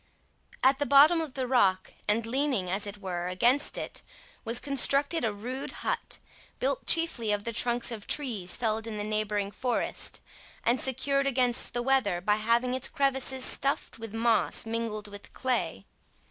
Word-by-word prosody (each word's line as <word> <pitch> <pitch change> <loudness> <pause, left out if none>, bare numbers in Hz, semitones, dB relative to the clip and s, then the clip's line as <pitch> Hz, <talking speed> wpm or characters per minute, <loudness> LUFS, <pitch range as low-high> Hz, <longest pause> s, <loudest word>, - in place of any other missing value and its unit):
At 265 +2 +4
the 290 - 0
bottom 300 +4 +6
of 310 -5 -6
the 260 -2 -2
rock, 200 -7 +1
and 215 +2 +1
leaning, 250 -7 -1
as 200 +2 -2
it 205 0 -7
were, 180 -3 -4
against 240 +10 +2
it, - - -6 0.4
was 230 +1 +3
constructed 280 +3 +2
a 225 - +1
rude 245 +7 -6
hut, - - -2 0.4
built - - -2
chiefly 325 -10 +3
of 205 0 -1
the 230 - -3
trunks 240 +2 +1
of 215 -3 -7
trees 220 -11 0
felled 225 -1 -2
in 215 -2 -5
the 205 - -3
neighbouring 210 -1 -2
forest, 245 +4 -2 0.4
and 240 +2 +1
secured 275 +2 0
against 250 -2 +2
the 240 - 0
weather 240 -9 +1
by 210 +4 +1
having 235 +3 +1
its 260 - -1
crevices 265 -1 +1
stuffed 275 -3 0
with 225 -1 -7
moss 225 0 +1
mingled 225 -2 -4
with 205 0 -12
clay. 245 - -2
235 Hz, 165 wpm, -28 LUFS, 210-265 Hz, 0.4 s, bottom